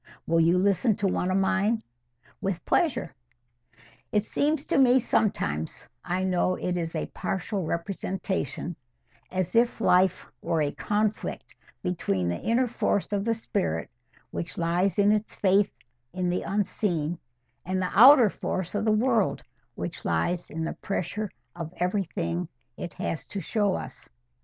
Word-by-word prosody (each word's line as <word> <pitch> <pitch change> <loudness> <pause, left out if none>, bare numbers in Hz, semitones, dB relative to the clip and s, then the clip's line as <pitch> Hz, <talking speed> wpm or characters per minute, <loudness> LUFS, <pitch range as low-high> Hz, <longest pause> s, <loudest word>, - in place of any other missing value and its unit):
"Will 165 0 +2
you 165 +2 +4
listen 200 +3 +3
to 200 -2 0
one 180 -1 0
of 185 - +2
mine?" 195 +3 +1 0.6
"With 195 -3 -2
pleasure." 310 - +1 1.0
"It 210 0 +2
seems 295 0 0
to - - +2
me 255 -1 +6
sometimes—I 180 - -1
know 185 0 +1
it 180 0 -2
is 165 -1 -3
a 160 - -1
partial 190 -1 -2
representation—as 170 - -4
if 235 0 +3
life 185 -3 +3 0.2
were 160 -2 +1
a 145 - 0
conflict 210 +4 -2 0.3
between 100 - 0
the 85 - -3
inner 235 +3 +2
force 210 -4 -1
of 200 0 0
the 230 0 +2
spirit, 80 - -2 0.4
which 170 -3 -5
lies 175 +4 +1
in 205 0 +5
its 215 0 0
faith 195 +1 +3 0.4
in 180 -1 0
the 180 - 0
unseen—and 170 - -3
the 185 -1 -1
outer 250 -1 +8
force 185 -2 -3
of 205 +1 -1
the 215 - +4
world, 220 - +2 0.3
which - - -5
lies 170 - 0
in 160 +1 -4
the 160 - -2
pressure 200 +2 -3 0.3
of 165 -2 -5
everything 180 -2 -1 0.3
it 175 - -7
has 155 -5 -3
to 200 - -5
show 200 +2 +1
us. 130 - -8
185 Hz, 140 wpm, -27 LUFS, 165-210 Hz, 1.0 s, outer